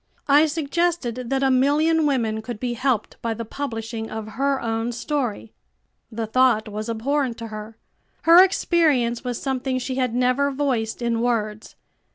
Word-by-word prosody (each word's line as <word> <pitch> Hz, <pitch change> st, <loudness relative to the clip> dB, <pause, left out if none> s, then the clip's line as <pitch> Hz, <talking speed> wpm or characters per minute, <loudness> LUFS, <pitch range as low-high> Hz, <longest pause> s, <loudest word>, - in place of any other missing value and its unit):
I 295 Hz, +2 st, +5 dB
suggested 295 Hz, -5 st, -1 dB
that 270 Hz, 0 st, 0 dB
a 265 Hz, -, +3 dB
million 300 Hz, +4 st, +3 dB
women 225 Hz, -6 st, 0 dB
could 225 Hz, -1 st, -7 dB
be 245 Hz, 0 st, -2 dB
helped 250 Hz, -1 st, -1 dB
by 230 Hz, -1 st, -2 dB
the 230 Hz, -, -5 dB
publishing 225 Hz, -3 st, -5 dB
of 220 Hz, 0 st, -6 dB
her 275 Hz, +5 st, 0 dB
own 225 Hz, +1 st, -2 dB
story. 245 Hz, -4 st, -3 dB, 0.6 s
The 225 Hz, 0 st, -3 dB
thought 230 Hz, -1 st, +3 dB
was 215 Hz, +2 st, -5 dB
abhorrent 250 Hz, +2 st, -1 dB
to 230 Hz, -1 st, -7 dB
her. 215 Hz, +1 st, -8 dB, 0.5 s
Her 340 Hz, +3 st, +8 dB
experience 305 Hz, -11 st, +1 dB
was 245 Hz, -2 st, -3 dB
something 265 Hz, -1 st, -2 dB
she 255 Hz, +1 st, -3 dB
had 250 Hz, -3 st, 0 dB
never 255 Hz, +3 st, +2 dB
voiced 255 Hz, -5 st, -2 dB
in 230 Hz, -1 st, 0 dB
words. 215 Hz, -3 st, -2 dB
250 Hz, 160 wpm, -23 LUFS, 225-280 Hz, 0.6 s, Her